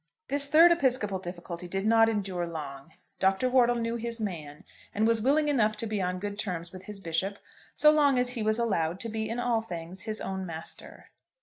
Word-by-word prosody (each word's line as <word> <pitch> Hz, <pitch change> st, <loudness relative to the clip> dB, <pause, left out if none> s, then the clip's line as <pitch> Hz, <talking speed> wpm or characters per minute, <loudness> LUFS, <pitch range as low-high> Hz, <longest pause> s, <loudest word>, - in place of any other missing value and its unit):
This 280 Hz, +1 st, +1 dB
third 325 Hz, +4 st, +7 dB
episcopal 255 Hz, -, +1 dB
difficulty 175 Hz, -1 st, -7 dB
did 195 Hz, +3 st, -3 dB
not 225 Hz, 0 st, +5 dB
endure 190 Hz, -5 st, -2 dB
long. 145 Hz, -2 st, -7 dB, 0.3 s
Dr. 190 Hz, +6 st, +2 dB
Wortle 245 Hz, -2 st, +4 dB
knew 230 Hz, 0 st, -2 dB
his 235 Hz, 0 st, -4 dB
man, 155 Hz, -8 st, -5 dB, 0.3 s
and 215 Hz, +2 st, +2 dB
was 230 Hz, -1 st, +3 dB
willing 295 Hz, +5 st, +3 dB
enough 215 Hz, -7 st, +2 dB
to 230 Hz, -, -3 dB
be 215 Hz, -2 st, -2 dB
on 180 Hz, 0 st, -1 dB
good 205 Hz, +2 st, -5 dB
terms 170 Hz, -4 st, -3 dB
with 185 Hz, 0 st, -10 dB
his 210 Hz, -1 st, -6 dB
bishop 190 Hz, +3 st, -2 dB, 0.4 s
so 300 Hz, -, +6 dB
long 290 Hz, -3 st, +4 dB
as 250 Hz, 0 st, +1 dB
he 245 Hz, -2 st, -3 dB
was 215 Hz, +1 st, +1 dB
allowed 185 Hz, -7 st, 0 dB
to 230 Hz, -, -4 dB
be 220 Hz, 0 st, -3 dB
in 230 Hz, +2 st, -3 dB
all 240 Hz, -2 st, +1 dB
things 175 Hz, -2 st, -7 dB
his 215 Hz, -1 st, -4 dB
own 190 Hz, 0 st, -4 dB
master. 165 Hz, -2 st, -8 dB
210 Hz, 205 wpm, -28 LUFS, 180-235 Hz, 0.4 s, third